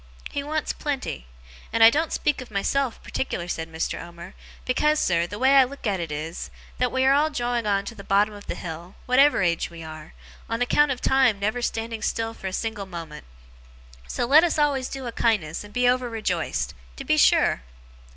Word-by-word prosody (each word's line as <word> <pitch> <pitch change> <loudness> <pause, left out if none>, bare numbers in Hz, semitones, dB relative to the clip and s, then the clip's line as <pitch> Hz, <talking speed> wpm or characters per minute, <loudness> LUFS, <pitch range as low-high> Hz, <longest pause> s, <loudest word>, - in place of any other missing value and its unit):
He 285 - -2
wants 305 +2 -2
plenty. 265 - -4 0.4
And 225 - +4
I 225 - +10
don't 315 +4 0
speak 295 -3 0
of 255 - -10
myself, 235 +5 -1
particular,' 175 -9 -3
said 165 -2 -4
Mr. 160 0 -3
Omer, 170 +2 -10 0.3
'because, 300 +4 +2
sir, 170 -1 +1
the 205 - -7
way 265 +3 +4
I 270 - +9
look 270 +1 -7
at 200 -4 0
it 165 -3 -4
is, 155 +3 -5 0.3
that 250 -1 +1
we 260 0 +1
are 270 - +6
all 295 +2 +3
drawing 240 -5 -1
on 200 -1 +1
to 235 - -6
the 200 - -11
bottom 205 +2 +2
of 205 0 -12
the - - -3
hill, 170 +2 -8
whatever 265 -3 +4
age 170 -2 0
we 170 -1 -10
are, 155 0 -10 0.4
on 230 0 -1
account 295 +4 +3
of 255 -2 -2
time 265 -5 +3
never 215 +4 -1
standing 225 -1 -3
still 225 0 -1
for 195 - -7
a - - -3
single 210 0 -3
moment. 165 -4 -8 0.8
So - - -1
let 295 +6 +7
us 345 - +1
always 280 -4 +1
do 270 -1 -6
a 240 - -3
kindness, 205 -10 0
and 205 - -12
be 245 +2 +2
over 250 0 +2
rejoiced. 190 -7 -2 0.2
To - - -7
be - - +2
sure! - - +4
225 Hz, 210 wpm, -24 LUFS, 180-265 Hz, 0.8 s, I